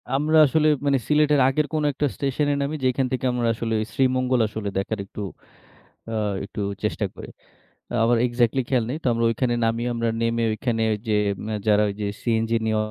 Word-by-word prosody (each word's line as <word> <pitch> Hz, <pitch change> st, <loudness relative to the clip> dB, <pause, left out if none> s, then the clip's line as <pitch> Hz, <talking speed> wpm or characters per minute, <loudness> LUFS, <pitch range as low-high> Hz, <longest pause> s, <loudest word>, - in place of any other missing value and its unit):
আমরা 155 Hz, +3 st, +2 dB
আসলে 155 Hz, +2 st, +2 dB, 0.2 s
মানে 140 Hz, -1 st, +3 dB
সিলেটের 150 Hz, -1 st, +3 dB
আগের 150 Hz, +3 st, +1 dB
কোনো 155 Hz, -1 st, 0 dB
একটা 145 Hz, -, -1 dB
স্টেশন 140 Hz, +1 st, -1 dB
এ -, -, +2 dB
নামি 140 Hz, +2 st, -2 dB
যেখান 130 Hz, +1 st, +2 dB
থেকে 130 Hz, 0 st, -2 dB
আমরা 120 Hz, -1 st, 0 dB
আসলে 115 Hz, 0 st, -2 dB, 0.2 s
শ্রীমঙ্গল 130 Hz, -1 st, +2 dB
আসলে 105 Hz, -1 st, -4 dB
দেখার 100 Hz, +2 st, -2 dB
একটু 100 Hz, -, -8 dB, 0.9 s
আ -, -, -3 dB, 0.3 s
একটু 105 Hz, -, -6 dB, 0.2 s
চেষ্টা -, -, -1 dB
করি। -, -, -9 dB, 0.8 s
আমার 120 Hz, +1 st, +3 dB
এক্সাক্টলি 120 Hz, +1 st, +1 dB
খেয়াল 125 Hz, -3 st, +2 dB
নেই। 140 Hz, -, -2 dB
তো -, -, 0 dB
আমরা 115 Hz, 0 st, 0 dB
ঐখানে 120 Hz, +1 st, 0 dB
নামিয়ে 115 Hz, +2 st, 0 dB
আমরা 115 Hz, 0 st, 0 dB
নেমে 115 Hz, 0 st, 0 dB
ওইখানে 115 Hz, +1 st, -2 dB, 0.3 s
যে 110 Hz, -, +1 dB, 0.5 s
যারা 105 Hz, 0 st, +4 dB
ওইযে 105 Hz, +1 st, -4 dB, 0.2 s
সিএনজি 115 Hz, -1 st, +1 dB
নিয়ে 110 Hz, -1 st, +1 dB
120 Hz, 175 wpm, -23 LUFS, 115-135 Hz, 0.9 s, যারা